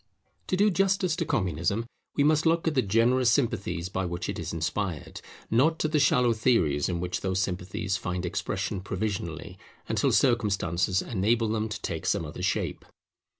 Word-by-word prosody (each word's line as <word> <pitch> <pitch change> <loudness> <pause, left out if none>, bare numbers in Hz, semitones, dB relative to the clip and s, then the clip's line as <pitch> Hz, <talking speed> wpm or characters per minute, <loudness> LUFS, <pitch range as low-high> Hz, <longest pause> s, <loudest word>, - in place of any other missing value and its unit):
To 185 - 0
do 205 +2 +4
justice 190 -2 +2
to 165 - -1
Communism, 95 - 0 0.3
we 140 - +3
must 155 +2 +3
look 165 0 +2
at 160 - +2
the 130 - +3
generous 120 +4 +3
sympathies 95 - 0
by 95 0 -2
which 85 0 -3
it - - -3
is - - -4
inspired, 85 0 -3 0.3
not 155 +8 +3
at 155 - 0
the 155 - +3
shallow 125 -4 +4
theories 105 - +2
in 85 -2 -1
which 90 +1 -3
those 95 0 -1
sympathies 95 +1 -2
find 90 0 -3
expression 95 +2 -2
provisionally, 95 -4 -4 0.3
until - - +1
circumstances 95 -7 +2
enable 115 +2 +1
them 110 0 -1
to 105 - -5
take - - -3
some 80 - +1
other 80 +4 -7
shape. 90 0 -1
105 Hz, 170 wpm, -27 LUFS, 90-130 Hz, 0.3 s, do